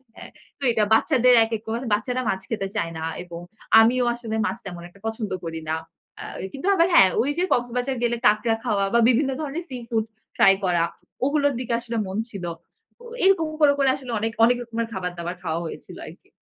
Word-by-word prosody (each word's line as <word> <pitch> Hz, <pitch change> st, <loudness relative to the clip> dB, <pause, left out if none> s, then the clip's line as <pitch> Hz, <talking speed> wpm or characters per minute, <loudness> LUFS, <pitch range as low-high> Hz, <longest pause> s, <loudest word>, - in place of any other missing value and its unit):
হ্যাঁ। -, -, -11 dB, 0.3 s
তো -, -, -8 dB
এটা 220 Hz, -2 st, +2 dB
বাচ্চাদের 250 Hz, 0 st, +4 dB
একেক 225 Hz, -1 st, -4 dB
কর 230 Hz, +1 st, -2 dB
বাচ্চারা 250 Hz, +4 st, -1 dB
মাছ 190 Hz, 0 st, -1 dB
খেতে 195 Hz, -3 st, -2 dB
চায় 165 Hz, 0 st, -1 dB
না। 160 Hz, -, -5 dB, 0.2 s
এবং 170 Hz, -1 st, -9 dB, 0.4 s
আমিও 245 Hz, +2 st, +3 dB
আসলে 225 Hz, -2 st, -5 dB
মাছ -, -, -2 dB
তেমন 175 Hz, -3 st, -7 dB
একটা 200 Hz, -, -21 dB
পছন্দ 220 Hz, -1 st, -4 dB
করি 165 Hz, -1 st, -5 dB
না। -, -, +1 dB, 0.5 s
আ -, -, -6 dB, 0.3 s
কিন্তু 280 Hz, +8 st, -5 dB
আবার 335 Hz, 0 st, +4 dB
হ্যাঁ, 190 Hz, -1 st, +8 dB
ওই 275 Hz, -, 0 dB
যে 360 Hz, -, +1 dB
কক্সবাজার 245 Hz, +2 st, -1 dB
গেলে 240 Hz, 0 st, +1 dB
কাঁকড়া 215 Hz, +2 st, +3 dB
খাওয়া 200 Hz, -2 st, +1 dB
বা 235 Hz, -, +5 dB
বিভিন্ন 265 Hz, +3 st, +2 dB
ধরনের 305 Hz, +4 st, -4 dB
সি-ফুড 230 Hz, -3 st, -3 dB, 0.3 s
ট্রাই 195 Hz, -, +7 dB
করা, 175 Hz, -2 st, +2 dB, 0.4 s
ওগুলোর 285 Hz, -1 st, +2 dB
দিকে 245 Hz, -2 st, -3 dB
আসলে 235 Hz, -1 st, -5 dB
মন 190 Hz, +2 st, -4 dB
ছিল। 195 Hz, -5 st, -7 dB, 0.6 s
ও -, -, -12 dB, 0.2 s
এরকম 375 Hz, -5 st, +4 dB
করে 285 Hz, -1 st, +6 dB
করে 270 Hz, -1 st, +4 dB
আসলে 260 Hz, -3 st, -8 dB
অনেক, 225 Hz, +1 st, -1 dB
অনেক 245 Hz, +1 st, +3 dB
রকমের 230 Hz, 0 st, -3 dB
খাবার-দাবার 180 Hz, -1 st, -4 dB
খাওয়া 165 Hz, 0 st, -2 dB
হয়েছিল -, -, -9 dB
আরকি। -, -, -14 dB
230 Hz, 195 wpm, -24 LUFS, 195-255 Hz, 0.6 s, হ্যাঁ